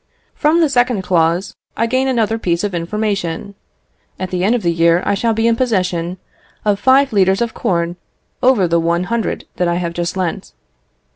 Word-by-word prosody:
"From 320 +3 +2
the 320 - +4
second 245 -6 +1
clause, 170 0 +1 0.2
I 230 - +2
gain 255 +3 0
another 225 -3 0
piece 170 -3 -1
of 205 -2 -2
information. 195 +1 -2 0.7
At 185 -1 -4
the 180 -1 -1
end 215 +5 +3
of 240 - -2
the 170 - +2
year 170 +1 +3
I - - +1
shall 225 +3 0
be 225 +1 0
in 230 0 +3
possession 185 -7 -1 0.5
of 205 -1 +2
five 265 +1 +4
litres 190 -1 +3
of 235 -1 -1
corn 170 -1 -1 0.4
over 250 -8 +4
the 170 0 +2
one 170 +1 0
hundred 230 +3 -2
that 180 - +1
I 170 - +1
have 170 -1 -2
just 175 +2 -3
lent. 170 - -3
190 Hz, 190 wpm, -17 LUFS, 170-230 Hz, 0.7 s, the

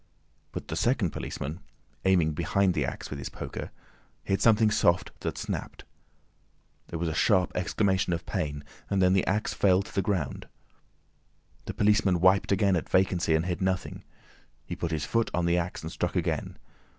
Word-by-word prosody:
But - - -7
the 80 - -2
second 110 - +1
policeman, 75 +6 -5 0.5
aiming 90 -5 +4
behind 90 +4 +1
the 75 -5 0
axe - - -6
with 70 - -5
his 65 - -5
poker, - - -6 0.5
hit 95 0 0
something 110 -1 +5
soft 85 -3 +2
that - - -4
snapped. - - -5 1.0
There 85 - -5
was 85 +1 -2
a 80 - -1
sharp 90 +1 +3
exclamation 95 0 +1
of 85 0 -2
pain 75 -7 -3 0.3
and 100 - +1
then 90 0 +4
the 95 - +2
axe 105 +3 0
fell 95 -1 +3
to - - -13
the 100 - +1
ground. 90 -7 -2 1.2
The - - -5
policeman 105 -3 +3
wiped 95 +3 +4
again 100 0 +3
at 85 - -3
vacancy 90 -3 +2
and 80 +2 +1
hit 90 0 -2
nothing; 95 0 -2 0.6
he - - -5
put 85 - -3
his 80 -3 -2
foot 115 -1 +1
on 90 -1 +1
the 85 +1 +3
axe, 85 -1 -4
and 80 - -5
struck 90 +2 -2
again. 85 -4 -1
90 Hz, 175 wpm, -28 LUFS, 85-100 Hz, 1.2 s, something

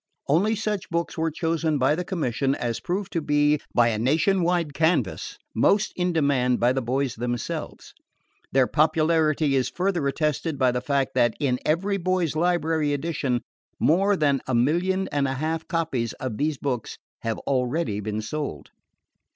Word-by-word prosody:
Only 195 +10 +3
such 210 -2 -3
books 170 0 -2
were 165 0 0
chosen 160 -1 0
by 135 +2 +3
the 175 +4 -2
Commission 140 - -1
as 120 -2 -2
proved 195 +2 -3
to 165 - 0
be, 145 0 +2
by 120 -1 +5
a 110 -2 -1
nation 160 - +2
wide 170 -3 0
canvas, 160 +4 0 0.2
most 205 +1 +2
in 180 0 0
demand 140 -6 +2
by 120 +1 +3
the 135 - -1
boys 130 +2 -1
themselves. 120 0 -4 0.6
Their 135 -1 +4
popularity 155 -1 +2
is 130 -2 +1
further 180 -5 -1
attested 150 +1 -1
by 130 -2 +3
the 125 0 -2
fact 140 -1 0
that 120 -1 +2
in 130 -3 +1
the - - -9
EVERY 195 +6 +1
BOY'S 185 -4 0
LIBRARY 160 -3 +1
Edition, 140 -4 -1 0.4
more 195 +5 +3
than 140 -4 +2
a 130 - 0
million 175 +10 +1
and 140 -1 +1
a 135 - -2
quarter 160 +3 -2
copies 155 - -1
of 125 -5 -5
these 150 0 0
books 130 -5 -3 0.2
have 115 -1 -2
already 125 -3 0
been 105 +1 -3
sold. 110 - -5
150 Hz, 165 wpm, -25 LUFS, 130-170 Hz, 0.6 s, by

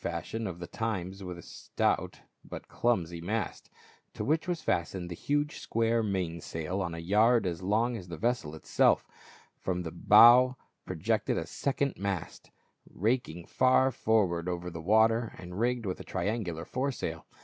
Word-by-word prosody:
429 - - -2
fashion 115 -1 -4
of 90 -3 -6
the 90 - -6
times 95 -3 -4
with 90 -1 -6
a 85 - -11
stout - - -2 0.2
but - - -9
clumsy 85 -8 -1
mast, 105 +2 -3 0.5
to - - -3
which 160 +4 +1
was 175 -3 -2
fastened 90 +1 -1
the - - -4
huge 145 - -1
square 115 0 +1
main 90 -6 -2
sail 80 +6 -4
on 85 -3 -3
a - - -7
yard 105 +7 +3
as 85 -1 -3
long 110 +6 +1
as 95 -5 -7
the 85 -1 -7
vessel 110 -9 -1
itself 80 - +2 0.5
From 90 -1 -2
the 80 - -5
bow 120 +8 +7 0.3
pro - - -4
jected - - 0
a - - -2
second 140 0 -2
mast, 100 -4 -4 0.4
raking 100 -5 -1
far 130 +1 +3
forward 95 -8 +1
over 90 0 -4
the 85 -1 -7
water 110 +5 +3
and 90 +2 -8
rigged 120 0 0
with 95 -2 -3
a - - -7
triangular 95 -3 -3
fore 135 +2 -1
sail. - - -5
100 Hz, 170 wpm, -30 LUFS, 85-115 Hz, 0.5 s, bow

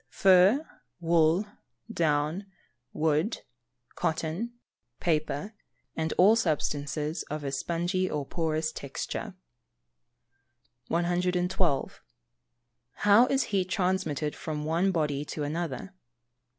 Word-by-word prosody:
_ - - -44
Fur, 195 - +5 0.3
wool, 165 +2 +3 0.5
down, 155 +3 0 0.4
wood, 160 +7 0 0.5
cotton, 165 +8 -2 0.5
paper, 155 +4 -1 0.4
and 160 -1 -1
all 200 +5 +6
substances 150 -4 -1
of 150 0 -4
a 140 - -2
spongy 175 +6 -1
or 145 -2 -2
porous 160 0 -1
texture. 170 +8 -5 1.5
112. 175 -2 0 1.0
_How 210 +5 +6
is 270 0 +2
heat 185 -2 +1
transmitted 180 -7 0
from 150 -1 -4
one 170 +5 +2
body 150 -5 0
to 150 0 -5
another? 160 +3 -4
165 Hz, 95 wpm, -28 LUFS, 150-185 Hz, 1.5 s, all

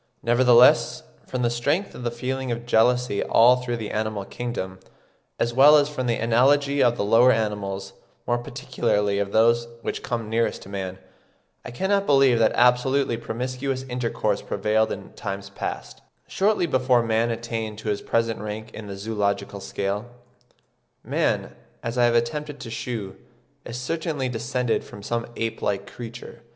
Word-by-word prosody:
Nevertheless, 120 +1 +5 0.2
from 125 -1 -2
the 120 - +2
strength 145 +11 0
of - - -9
the 120 - -1
feeling 125 +2 -3
of 120 0 -4
jealousy 120 -1 +2
all 125 +2 +5
through 125 -1 -3
the 110 -2 -5
animal 110 -2 -2
kingdom, 100 -6 -5 0.6
as 120 - 0
well 140 +4 +8
as 145 0 +2
from 130 -4 -3
the 115 - +2
analogy 140 +5 +3
of 120 0 +3
the - - 0
lower 115 +4 +6
animals, 100 -4 -2 0.3
more 120 0 +1
particularly 105 -3 -1
of 100 -1 -2
those 115 +2 +3 0.2
which - - -3
come 115 -4 -3
nearest 115 +1 -1
to - - -12
man, 95 -2 -5 0.7
I - - -7
cannot 195 +10 0
believe 135 -4 +5
that 110 - +4
absolutely 125 +1 +3
promiscuous 130 +3 -3
intercourse 120 -5 -1
prevailed 110 +2 0
in - - -7
times 100 0 -6
past, - - -6 0.3
shortly 205 -2 +1
before 130 -5 +2
man 115 +1 +1
attained 115 -2 -4
to 110 - -4
his 105 - -1
present 115 -1 0
rank 105 +1 -6
in 110 -1 -8
the 100 -1 -7
zoological 100 -1 -2
scale. 100 +3 -3 1.0
Man, - - -1 0.3
as 115 +2 -3
I 120 - +5
have 120 0 +2
attempted 145 +5 -1
to 115 - -7
shew, 115 -4 -5 0.5
is 120 - -6
certainly 150 -1 -2
descended 125 0 -1
from 100 - -12
some 115 +2 -2
ape 115 0 -3
like 100 -1 -1
creature. 120 0 -10
120 Hz, 160 wpm, -24 LUFS, 110-125 Hz, 1.0 s, well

